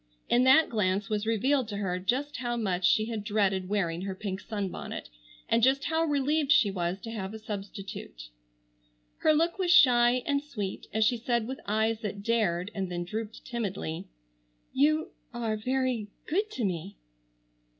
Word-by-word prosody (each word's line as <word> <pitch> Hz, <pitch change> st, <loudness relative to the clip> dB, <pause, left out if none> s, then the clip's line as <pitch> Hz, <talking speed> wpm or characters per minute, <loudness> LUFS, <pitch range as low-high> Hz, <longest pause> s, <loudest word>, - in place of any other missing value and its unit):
In 245 Hz, +1 st, +4 dB
that 270 Hz, +5 st, +7 dB
glance 200 Hz, -2 st, 0 dB
was 210 Hz, 0 st, -1 dB
revealed 255 Hz, +3 st, +2 dB
to 205 Hz, -2 st, -5 dB
her 185 Hz, -3 st, -1 dB
just 270 Hz, +10 st, -1 dB
how 240 Hz, -1 st, -2 dB
much 190 Hz, -5 st, 0 dB
she 215 Hz, -2 st, +3 dB
had 220 Hz, -2 st, -4 dB
dreaded 200 Hz, -3 st, 0 dB
wearing 175 Hz, -5 st, 0 dB
her 190 Hz, 0 st, -4 dB
pink 190 Hz, -1 st, -4 dB
sunbonnet, 200 Hz, -, -5 dB, 0.4 s
and 230 Hz, -, +3 dB
just 265 Hz, +3 st, +4 dB
how 320 Hz, +1 st, +1 dB
relieved 290 Hz, 0 st, +1 dB
she 210 Hz, -8 st, +5 dB
was 180 Hz, 0 st, -2 dB
to 225 Hz, -, -6 dB
have 205 Hz, -2 st, -5 dB
a -, -, -5 dB
substitute. 195 Hz, -, -7 dB, 0.9 s
Her 310 Hz, -, +3 dB
look 330 Hz, +4 st, +1 dB
was 365 Hz, -2 st, 0 dB
shy 250 Hz, -6 st, +6 dB
and 280 Hz, -1 st, +1 dB
sweet 215 Hz, -10 st, -5 dB
as 220 Hz, 0 st, +2 dB
she 240 Hz, +2 st, +2 dB
said 235 Hz, -1 st, 0 dB
with 260 Hz, +3 st, -5 dB
eyes 220 Hz, +1 st, +1 dB
that 205 Hz, -2 st, -5 dB
dared 205 Hz, -4 st, +1 dB
and 195 Hz, -3 st, -3 dB
then 175 Hz, 0 st, -2 dB
drooped 215 Hz, +4 st, -6 dB
timidly: 200 Hz, -9 st, -4 dB, 0.7 s
"You—are—very—good 255 Hz, -, -1 dB
to 250 Hz, -, -2 dB
me!" 185 Hz, +1 st, -3 dB
220 Hz, 160 wpm, -29 LUFS, 195-260 Hz, 0.9 s, that